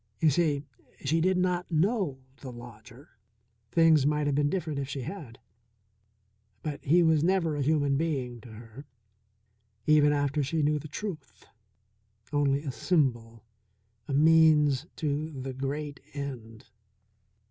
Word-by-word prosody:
You 155 - +4
see, 145 -2 0 0.4
she 160 +4 +1
did 185 +2 +2
not 180 -1 0
know 170 - 0
the 130 - -9
lodger. 120 +2 -13 0.6
Things 165 -4 +5
might 150 +1 +1
have 145 - 0
been 145 +1 +2
different 155 -5 -3
if 135 -1 -4
she 135 -1 -4
had. 125 - -8 1.3
But 145 -2 -5
he 170 +5 +4
was 160 -2 +3
never 170 -3 +1
a 145 - -2
human 145 -1 +1
being 130 -7 -2
to 125 - -13
her, 115 +5 -12 1.0
even 150 -1 +5
after 145 0 0
she 150 +3 -1
knew 150 +1 +1
the 150 - -9
truth; 155 - -7 0.9
only 145 -1 +1
a 140 - -3
symbol, 120 - -1 0.6
a 140 - -3
means 155 -2 +4
to 150 -1 -3
the 130 0 -5
great 140 +2 -4 0.2
end. 120 -6 -7
145 Hz, 135 wpm, -28 LUFS, 135-160 Hz, 1.3 s, Things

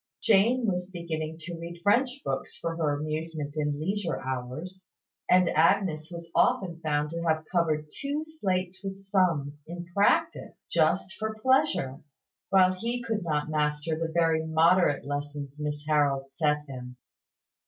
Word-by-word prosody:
Jane 230 +4 +4
was 180 -3 -1
beginning 160 -3 -4
to 170 +2 -6
read 170 +1 -7
French 255 +6 +2
books 135 0 -3
for 165 0 -3
her 155 -3 +1
amusement 155 -1 -4
in 150 -1 -1
leisure 190 +1 -1
hours; 130 +9 -5 0.5
and 180 -1 +6
Agnes 160 -1 +2
was 170 -1 -9
often 190 -9 +2
found 150 -1 0
to 170 0 -3
have 160 -1 +1
covered 155 -4 +1
two 290 +2 -2
slates 185 - -2
with 195 0 -4
sums 170 -8 0
in 175 +1 -6
Practice, 325 +11 +1
just 170 +4 +2
for 220 0 -2
pleasure, 260 - +2 0.5
while 185 -1 +5
he 235 +6 -3
could 225 -2 -1
not 150 -2 -1
master 150 +1 0
the 165 0 -3
very 165 -1 +2
moderate 160 -1 +3
lessons 145 0 -5
Miss 150 0 -3
Harold 140 -3 +2
set 150 +1 +1
him. 125 -2 -8
165 Hz, 145 wpm, -28 LUFS, 150-190 Hz, 0.5 s, and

